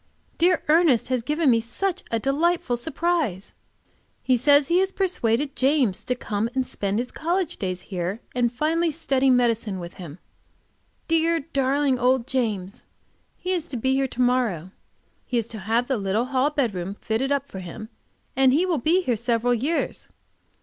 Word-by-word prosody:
Dear 350 0 +3
Ernest 305 -7 +4
has 255 -2 0
given 300 +3 +2
me 230 - +4
such 335 - -3
a 230 - 0
delightful 280 +2 +1
surprise! 310 - -2 0.7
He 255 - +3
says 285 +3 +4
he 345 +2 +3
has 380 0 +1
persuaded 285 - 0
James 265 -7 +1
to 250 - 0
come 220 -2 -2
and 260 -1 +1
spend 200 -4 -2
his 245 +2 -2
college 350 +1 -1
days 185 -2 -3
here, 185 +2 -4
and 245 -1 +1
finally 320 +6 0
study 275 -4 +1
medicine 230 -5 +1
with 170 -1 -8
him. 160 -3 -9 0.9
Dear, 330 0 +2
darling 275 -2 0
old 250 0 +2
James! 220 -8 -2 0.5
He 365 - -3
is 345 -3 -1
to 265 - -4
be 260 +3 +1
here 270 0 +1
to 255 - -4
morrow. 230 -9 0 0.6
He 245 - -1
is 230 -2 -1
to 220 - -7
have 225 +5 0
the 265 - 0
little 200 +4 0
hall 265 +2 +1
bedroom 200 -10 -2
fitted 230 +6 -2
up 280 -1 0
for 195 - -8
him, 185 +5 -8 0.5
and 265 -1 +4
he 330 +6 +3
will 345 -5 0
be 340 +9 +2
here 245 -8 +1
several 235 +1 +1
years. 275 +8 -2
255 Hz, 170 wpm, -24 LUFS, 225-305 Hz, 0.9 s, Ernest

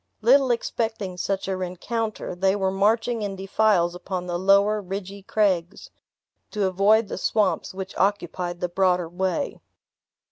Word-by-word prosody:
Little 260 +4 +5
expecting 225 -5 -2
such 190 +2 -2
a 190 - -1
rencounter, 185 +5 -4
they 190 +2 +1
were 190 -2 0
marching 225 +4 +1
in 200 -2 -3
defiles 190 -2 +2
upon 180 0 -5
the 175 -1 -3
lower 200 +3 +4
ridgy 195 +1 -6
craigs, 195 -2 -1 0.6
to 210 -2 -1
avoid 200 +4 +3
the - - -5
swamps 190 -4 0
which 190 0 -7
occupied 180 -3 -1
the 180 - 0
broader 180 -1 +1
way. 190 - -2
195 Hz, 140 wpm, -24 LUFS, 180-210 Hz, 0.6 s, Little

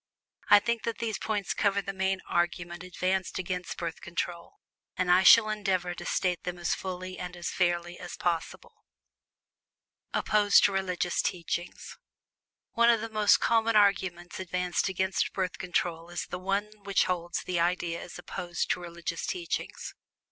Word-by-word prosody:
I 205 - +10
think 235 +1 -1
that 230 - -2
these 225 -3 -2
points 210 -2 -1
cover 200 -1 +1
the 195 0 -4
main 190 0 0
argument 175 0 -1
advanced 185 +1 -1
against 180 -1 -4
Birth 165 -2 -4
Control, 170 0 -4 0.4
and 180 -1 +2
I 180 +1 +6
shall 215 +3 +8
endeavor 190 -4 -1
to 175 0 -8
state 180 -2 0
them 180 0 -4
as 175 -1 0
fully 185 0 -5
and 180 0 -6
as 175 - -3
fairly 175 -1 0
as 175 - -7
possible. 170 -2 -3 1.3
OPPOSED 205 -1 +4
TO - - +5
RELIGIOUS 185 -2 0
TEACHINGS. 175 0 -4 0.7
One 235 0 +4
of 230 -2 +4
the 225 - -4
most 210 -1 +4
common 230 -1 +2
arguments 190 -4 +2
advanced 180 0 -1
against 190 0 0
Birth 185 -2 -2
Control 175 -2 -2
is 175 - -4
the 180 - -6
one 200 +3 -1
which 200 -1 +2
holds 175 -1 -2
that - - -5
the 180 -2 -1
idea 170 -1 0
is - - -9
opposed 175 0 -3
to - - 0
religious 170 -1 -5
teachings. 350 -2 -4
180 Hz, 160 wpm, -29 LUFS, 175-200 Hz, 1.3 s, I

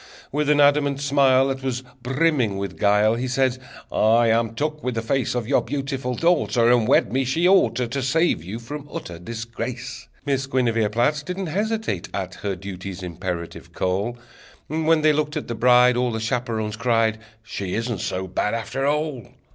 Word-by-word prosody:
With 150 +1 0
an 150 -1 +4
adamant 145 -1 +4
smile 135 -1 +3
That 135 0 -3
was 130 -1 -3 0.2
brimming 130 -5 +1
with 100 -2 -5
guile, 105 +1 +4
He 120 +3 -2
said: 130 0 +1 0.3
"I 115 +2 +4
am 115 0 +1
took 150 +3 -2
with 125 -2 -2
the 115 - -2
face 130 +2 0
Of 120 -3 -2
your 140 - +3
beautiful 135 -3 -3
daughter, 140 -8 +3
And 120 -3 +3
wed 120 -4 +3
me 135 +1 +2
she 160 +8 +1
ought 190 0 +4
ter, 125 - 0
To 135 +4 -3
save 150 - +1
you 95 +6 -6
from 145 +5 -8
utter 85 - -7
disgrace!" 115 +4 -6 0.2
Miss 135 -1 0
Guinevere 115 -5 +1
Platt 120 +7 +1
Didn't 180 +4 -4
hesitate 210 - -2
at 95 -1 -3
Her 100 +2 -4
duty's 95 0 -7
imperative 85 -1 -6
call. 100 +6 -1 0.5
When 160 0 +1
they 155 -1 +5
looked 150 0 -1
at - - -5
the 120 - -3
bride 125 +1 +5
All 125 0 +1
the 110 - -3
chaperons 110 -2 -2
cried: 115 -2 +1 0.2
"She 100 -4 -4
isn't 115 -2 -2
so 95 +1 -2
bad, 105 +4 -1
after 125 +5 -2
all!" 150 -5 -1
125 Hz, 180 wpm, -23 LUFS, 110-140 Hz, 0.5 s, they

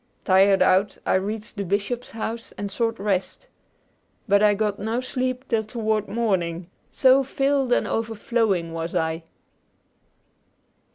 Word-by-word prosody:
Tired 190 0 +5
out, 185 +2 +2
I - - +2
reached 210 +3 -2
the 200 - -1
bishop's 205 +6 -2
house 230 +1 -5
and 200 -1 -5
sought 230 +2 -1
rest. 195 - -2 0.8
But 200 0 +4
I 210 -1 +5
got 210 -1 -1
no 220 +4 -1
sleep 255 0 -3
till 225 -2 +1
toward 215 -1 -1
morning, 185 -6 -1 0.2
so 265 +1 +5
filled 270 0 0
and - - +3
overflowing 225 -6 -1
was 165 +1 -4
I. 160 +1 -1
215 Hz, 130 wpm, -24 LUFS, 195-235 Hz, 0.8 s, Tired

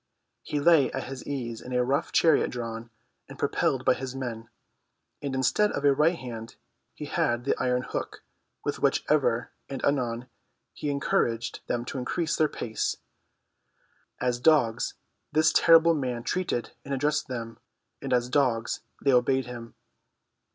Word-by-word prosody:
He 150 - -2
lay 155 -2 +5
at 130 - -2
his 135 0 -8
ease 120 -5 -4
in 125 - -7
a 125 0 +3
rough 135 +3 0
chariot 160 -3 +4
drawn 115 -1 -5 0.4
and - - -10
propelled - - 0
by - - +6
his 130 0 -6
men, 115 -4 -5 0.7
and 140 -2 -3
instead 130 - +2
of 140 - -2
a 140 - +6
right 155 +5 +3
hand 115 -4 -8 0.4
he - - -6
had 120 0 0
the 140 - +2
iron 125 0 +1
hook - - -5 0.4
with - - -2
which - - +2
ever - - +2 0.2
and 135 -2 -3
anon 125 -3 0 0.5
he 150 - -4
encouraged 120 -5 0
them 120 0 -1
to 130 - -4
increase 155 +6 -1
their 155 -2 +2
pace. 110 -2 -2 1.2
As 125 -1 0
dogs 120 -6 +3 0.4
this 155 +1 +3
terrible 165 0 +6
man 125 -6 -2
treated 145 -3 -2
and 140 0 -3
addressed 150 +3 0
them, 115 -3 -6 0.4
and - - -5
as 125 -1 +2
dogs 125 -4 +1 0.2
they 140 - +4
obeyed 130 +1 +3
him. 120 -1 -9
130 Hz, 155 wpm, -27 LUFS, 120-145 Hz, 1.2 s, by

